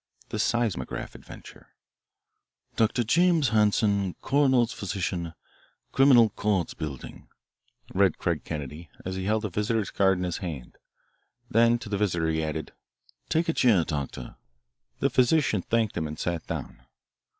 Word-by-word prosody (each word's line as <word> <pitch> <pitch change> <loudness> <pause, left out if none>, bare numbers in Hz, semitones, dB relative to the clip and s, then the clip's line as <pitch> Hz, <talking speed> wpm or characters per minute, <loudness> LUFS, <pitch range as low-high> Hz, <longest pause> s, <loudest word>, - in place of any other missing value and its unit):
V. - - -33
The - - -4
Seismograph 115 - -1
Adventure - - -14 1.0
"Dr. 115 +2 +2
James 165 +3 +3
Hanson, 105 -3 +2
Coroner's 130 -4 +3
Physician, 90 -5 -3 0.6
Criminal 130 -5 +6
Courts 100 -5 -1
Building," 70 -5 -7 0.7
read 95 -3 +3
Craig - - -1
Kennedy, 75 +2 -6 0.2
as 95 0 -3
he 95 0 -4
held 110 +2 0
a - - -2
visitor's 105 +3 -1
card 95 -1 +3
in 90 - -3
his 90 -2 -2
hand. 75 -10 -7 0.7
Then 115 +1 +4
to 115 -1 -10
the 100 -1 -2
visitor 85 -6 0
he 80 0 0
added, 80 0 -4 0.6
"Take 165 +2 +1
a 165 - +1
chair, 110 - +4
Doctor." 70 -6 -5 0.6
The - - +2
physician 130 - +3
thanked 110 +1 0
him 80 - -2
and 75 0 -7
sat 85 -1 -3
down. - - -6
100 Hz, 140 wpm, -27 LUFS, 85-115 Hz, 1.0 s, Criminal